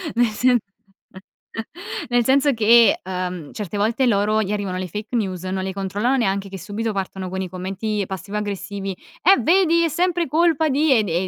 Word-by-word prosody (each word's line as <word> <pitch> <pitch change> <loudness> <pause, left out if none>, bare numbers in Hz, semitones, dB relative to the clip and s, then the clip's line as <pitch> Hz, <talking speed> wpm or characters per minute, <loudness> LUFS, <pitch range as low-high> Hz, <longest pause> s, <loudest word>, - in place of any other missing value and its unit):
nel 240 +1 +4
sen 245 +3 +2 1.5
nel 245 -1 +3
senso 275 +2 +3
che, 230 -1 +5
uhm, 180 -4 -4
certe 205 -2 -5
volte 225 +5 +1
loro 215 0 +2
gli 195 - -4
arrivano 200 -3 -2
le 185 0 -3
fake 210 +7 -6
news, 185 -5 -2
non 190 0 -2
le 190 0 -3
controllano 205 +7 0
neanche 195 -4 -1
che 195 - -7
subito 215 +3 -3
partono 190 -1 -4
con 190 +1 -3
i 185 - -4
commenti 195 +3 -3
passivo-aggressivi: 200 0 -4 0.3
"Eh 385 +3 +5
vedi 335 +3 +4
è 335 - +2
sempre 345 +1 0
colpa 320 +1 +2
di" 285 0 +3
e 220 - +2
de 180 -1 -1
210 Hz, 175 wpm, -21 LUFS, 190-250 Hz, 1.5 s, che